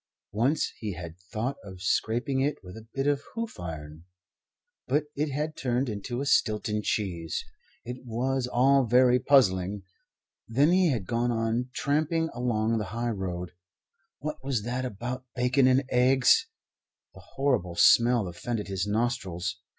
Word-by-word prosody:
Once 125 +9 +1
he 105 -3 -3
had 85 -1 -8 0.2
thought 120 +5 -2
of 95 -3 -10
scraping 120 +8 0
it 145 +2 +1
with 90 0 -10
a 110 0 -11
bit 135 0 0
of 145 -1 +2
hoof 230 -1 -4
iron, 80 -1 -7 0.8
but 145 +4 +2
it 150 +1 0
had 150 +3 -3
turned 125 +1 -1
into 120 +4 -4
a - - -2
Stilton 105 -4 +1
cheese. 90 -7 -2 0.4
It 125 +2 -7
was 125 +2 -1
all 130 +2 +4
very 125 +1 +5
puzzling. 100 -8 +3 0.6
Then 140 +8 +3
he 185 0 +4
had 115 -9 -1
gone 120 +2 0
on 115 +2 -1
tramping 155 +4 0
along 115 -2 0
the 105 - -2
high 120 0 0
road. 90 -4 -4 0.7
What 155 +1 -6
was 130 -6 -1
that 125 +3 -2
about 125 +3 -5
bacon 125 +2 +3
and 130 +1 +4
eggs? 130 +1 +4 0.7
The - - -13
horrible 125 -11 0
smell 120 +1 +5
offended 105 +5 -4
his 95 0 -2
nostrils. 105 -5 -2
120 Hz, 150 wpm, -28 LUFS, 105-135 Hz, 0.8 s, very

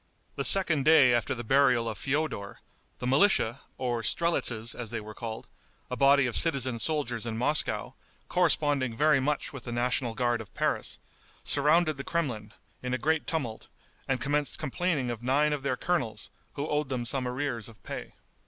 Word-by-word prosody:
The - - -2
second 170 -7 +4
day 145 -5 +6
after 120 -1 0
the 120 - -6
burial 125 -1 +3
of 110 - -3
Feodor, 135 -2 -2 0.4
the 125 - -6
militia, 135 - +3 0.2
or 120 -2 -1
strelitzes 120 -5 0
as 120 -3 -6
they 115 - -3
were 105 0 -9
called, 110 0 -6 0.5
a - - -1
body 140 +1 +5
of 120 - -2
citizen 130 -7 +2
soldiers 120 -4 -1
in 110 -1 -3
Moscow, 125 -3 0 0.3
corresponding 145 -9 +2
very 150 0 +4
much 145 +2 -1
with 135 -3 -8
the 120 - -5
national 120 -1 0
guard 120 -1 0
of 110 - -12
Paris, - - -1 0.5
surrounded 155 0 +3
the 140 - -5
Kremlin, 125 -12 -3 0.3
in 125 0 -2
a - - -1
great 155 +4 0
tumult, 130 -9 -3 0.4
and 135 -1 0
commenced 145 +3 -1
complaining 155 -3 -1
of 115 -1 -6
nine 145 +5 +2
of 145 - -3
their 130 -2 -1
colonels, 125 -13 -2 0.2
who 145 +1 -4
owed 150 -2 -1
them 125 -3 -2
some 130 +1 -1
arrears 125 -4 -3
of 110 - -18
pay. - - -7
130 Hz, 175 wpm, -28 LUFS, 120-150 Hz, 0.5 s, day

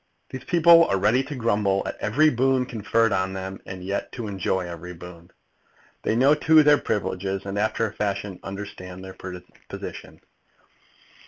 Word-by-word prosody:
These 130 -1 -7
people 170 -1 +6
are 100 - 0
ready 105 +7 +3
to 145 +1 -6
grumble 105 -5 +1
at - - -4
every 150 +9 +3
boon 130 +1 +2
conferred 115 -1 0
on 95 0 -1
them, 95 0 -6
and 95 -1 -7
yet 100 +2 -3
to 120 - -5
enjoy 95 -2 -1
every 85 +1 -8
boon. 85 0 -12 0.7
They - - 0
know, 135 +5 +5
too, 155 +1 +5
their 150 0 +5
privileges, 95 -1 -2
and, 100 0 -4
after 110 +2 0
a 105 - -9
fashion, 100 -2 -3
understand 95 -2 -8
their 95 - -9 0.6
position. - - -8
105 Hz, 160 wpm, -24 LUFS, 95-125 Hz, 0.7 s, people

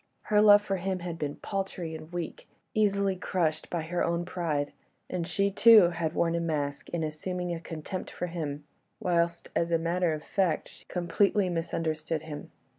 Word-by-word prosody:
Her 210 -1 +3
love 205 -1 +8
for 195 -2 -1
him 190 +1 -1
had 170 -2 -5
been 145 -1 -2
paltry 190 -4 -4
and 155 +1 -8
weak, 175 -2 -5 0.2
easily 200 -2 +2
crushed 165 -4 -1
by 170 -2 -2
her 175 +2 -1
own 170 +1 0
pride; 155 -5 -2 0.4
and 175 -2 -2
she, 200 +3 +1
too, 215 -3 +8
had 165 -1 -2
worn 165 -1 +2
a 170 - +1
mask 145 -4 -2
in 170 -2 -2
assuming 175 +3 -3
a 165 - -4
contempt 165 +2 -6
for - - -4
him, 155 -4 -4 0.4
whilst, 170 -1 0
as 170 0 +1
a 165 - +4
matter 170 +1 +1
of 150 - -8
fact, 185 -6 0
she - - -17
completely 185 +2 +1
misunderstood 160 -2 -2
him. 150 -2 -7
170 Hz, 180 wpm, -29 LUFS, 160-185 Hz, 0.4 s, love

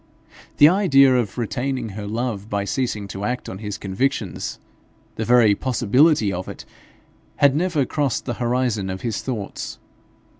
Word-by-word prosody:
The 145 - +8
idea 140 -8 +5
of 120 -4 -1
retaining 125 +1 -2
her 105 +1 -6
love 110 -2 -3
by 100 -2 -1
ceasing 110 -3 -2
to 95 +1 -6
act 125 +3 -2
on 95 - -7
his 105 -2 -5
convictions 100 - -2 0.6
the 110 - -3
very 120 -3 +5
possibility 125 0 +2
of 90 +1 -5
it - - -9 0.7
had 140 -1 +4
never 160 -4 +1
crossed 140 -1 -1
the 120 - -2
horizon 120 -5 0
of 95 0 -5
his 115 -4 -2
thoughts. 115 -7 -5
120 Hz, 150 wpm, -22 LUFS, 100-135 Hz, 0.7 s, The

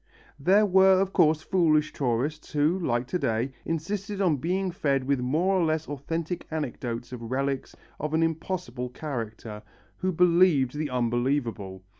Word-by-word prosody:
There 195 +9 +4
were 190 -1 +5
of 195 0 0
course 155 0 +3
foolish 155 -5 +2
tourists 135 +4 -2
who, 155 +5 +2
like 120 -8 0
to 180 - -1
day, 120 -2 0
insisted 195 +5 -3
on 175 -7 +2
being 185 +6 -1
fed 140 -5 0
with 140 0 0
more 155 +10 +1
or - - +2
less 160 -1 0
authentic 165 +5 -4
anecdotes 125 -6 -4
of 115 -2 -7
relics 135 0 -2 0.2
of 150 +1 -2
an 165 - +3
impossible 160 -6 -3
character, 115 -6 -6 0.4
who 185 0 -1
believed 170 -6 +4
the 150 0 -2
unbelievable. 120 -5 -1
150 Hz, 150 wpm, -27 LUFS, 125-175 Hz, 0.4 s, were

